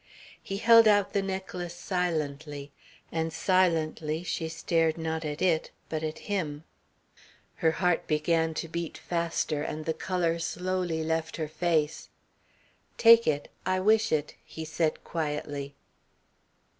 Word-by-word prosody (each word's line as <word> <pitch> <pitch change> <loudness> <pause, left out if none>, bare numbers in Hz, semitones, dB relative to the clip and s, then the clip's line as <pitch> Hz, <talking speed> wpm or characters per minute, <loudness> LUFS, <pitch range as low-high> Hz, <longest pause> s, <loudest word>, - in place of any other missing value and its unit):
He 195 - -4
held 230 +1 +7
out 205 -2 +4
the 200 - +2
necklace 190 -2 -4
silently, 150 -6 -3 0.4
and 160 0 -1
silently 160 -3 +1
she 165 -2 -2
stared 165 0 +1
not 160 0 -2
at 150 +1 -3
it 170 -4 +2 0.2
but 155 -1 -2
at 155 0 -3
him. 160 -8 -2 0.9
Her 160 - +3
heart 180 -1 +1
began 160 +1 +1
to 165 - -3
beat 170 0 -4
faster, 170 -3 -1
and 155 +1 -4
the 160 - 0
colour 170 0 -1
slowly 180 -1 -2
left 160 0 -2
her 160 -2 -2
face. 155 -1 0 0.9
"Take 230 0 +7
it. 145 -1 0
I 185 0 +1
wish 215 +3 +3
it," 150 -1 0
he 160 - -8
said 160 0 -1
quietly. 145 -3 -3
165 Hz, 130 wpm, -28 LUFS, 155-180 Hz, 0.9 s, held